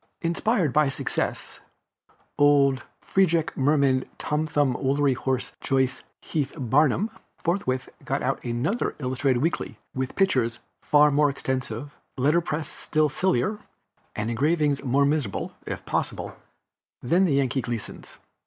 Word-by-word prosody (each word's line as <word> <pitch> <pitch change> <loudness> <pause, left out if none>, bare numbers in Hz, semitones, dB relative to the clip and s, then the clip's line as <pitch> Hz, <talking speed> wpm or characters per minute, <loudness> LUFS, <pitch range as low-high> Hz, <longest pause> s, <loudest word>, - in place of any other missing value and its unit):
Inspired 170 - +1
by 150 0 +4
his 135 - -2
success, - - -3 0.8
old 140 -2 +5 0.2
Feejec 170 -4 +2
Mermaid 135 -2 +2
Tom 150 +1 -1
Thumb 145 -4 +2
Woolly 135 +2 +1
Horse 130 0 -2
Joyce 130 -2 +1 0.2
Heth 145 -2 -2
Barnum 150 - +2 0.3
forthwith 145 -8 -1 0.2
got - - -2
out - - -1
another 125 - -1
illustrated 130 -1 0
weekly, 165 - -2 0.2
with 130 0 -3
pictures 125 - +2 0.2
far 150 0 +5
more 145 +1 +4
extensive, 130 0 -4 0.2
letter 150 +6 +3
press 160 -2 -3
still 155 -1 0
sillier, 190 - 0 0.6
and 110 +2 -2
engravings 145 +3 +1
more 140 +2 +3
miserable, 140 -9 -1
if - - -5
possible, - - -2 0.7
than 175 +9 +3
Yankee 135 -3 +1
Gleason's. 115 -4 -6
140 Hz, 125 wpm, -25 LUFS, 130-155 Hz, 0.8 s, old